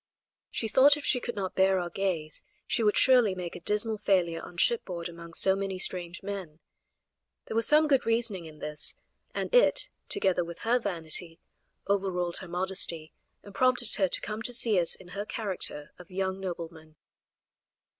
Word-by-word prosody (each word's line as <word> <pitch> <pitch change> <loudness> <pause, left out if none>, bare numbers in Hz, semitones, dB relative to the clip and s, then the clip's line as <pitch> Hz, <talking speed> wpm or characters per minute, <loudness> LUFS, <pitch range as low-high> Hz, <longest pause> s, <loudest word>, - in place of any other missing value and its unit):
She 225 - -2
thought 280 +6 +5
if 295 - -7
she 250 - +3
could 240 - -5
not 190 -2 -3
bear 190 0 +3
our 175 -1 -3
gaze 175 -6 -2 0.2
she - - 0
would 210 -2 +2
surely 245 -7 +5
make 180 -2 -6
a - - -7
dismal 210 +4 +1
failure 175 -5 +1
on 175 - -11
shipboard 180 -5 +1
among 170 -1 -10
so 190 0 +6
many 195 -1 -3
strange 180 -1 -3
men. 190 -6 -6 0.9
There - - -6
was 230 0 +2
some 305 +1 +5
good 275 -3 +3
reasoning 225 -6 0
in 155 -1 -12
this, 150 0 -1 0.4
and - - -3
it, - - +5 0.2
together 180 -2 +1
with 170 0 -9
her 240 +2 +2
vanity, 165 -4 -1 0.5
overruled 185 -3 0
her 190 - -6
modesty, 175 -3 -1 0.3
and 200 - -13
prompted 245 -1 +2
her 195 - +3
to - - 0
come 215 +1 -5
to 245 +1 -2
see 220 -5 +4
us 170 - 0
in 180 - -15
her 200 +3 -4
character 195 -9 -4
of 180 - -13
young 190 0 -3
nobleman. 165 -4 -7
190 Hz, 175 wpm, -28 LUFS, 170-215 Hz, 0.9 s, so